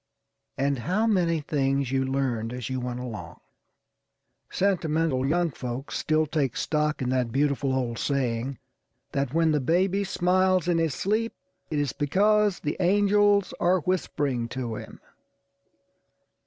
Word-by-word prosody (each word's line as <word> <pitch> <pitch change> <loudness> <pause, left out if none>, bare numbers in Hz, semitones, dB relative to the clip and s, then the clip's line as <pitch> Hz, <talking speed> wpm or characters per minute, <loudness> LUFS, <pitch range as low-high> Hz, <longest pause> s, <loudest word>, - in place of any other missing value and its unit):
And 140 -1 0
how 185 - 0
many 175 -7 +2
things 135 -3 0
you 135 0 +1
learned 130 -4 -1
as 125 0 -5
you 130 - -1
went 125 0 -4
along! 120 -4 -7 1.1
Sentimental 160 -8 +1
young 170 +2 +1
folks 125 +1 -5
still 155 0 +1
take 145 -5 -1
stock 150 -2 0
in 125 - -1
that 125 -2 0
beautiful 140 0 +1
old 120 -3 -2
saying 130 -2 -1 0.5
that 140 0 -2
when 165 -1 +3
the 150 - +2
baby 185 +8 +2
smiles 185 -1 +2
in 170 -2 +2
his 160 -5 0
sleep, 220 +4 0 0.4
it 155 - -2
is 145 -4 0
because 205 +6 +2
the 150 - -2
angels 205 +1 +3
are 180 +1 +3
whispering 145 -8 -1
to 120 -1 -4
him. - - -8
150 Hz, 140 wpm, -26 LUFS, 130-180 Hz, 1.1 s, when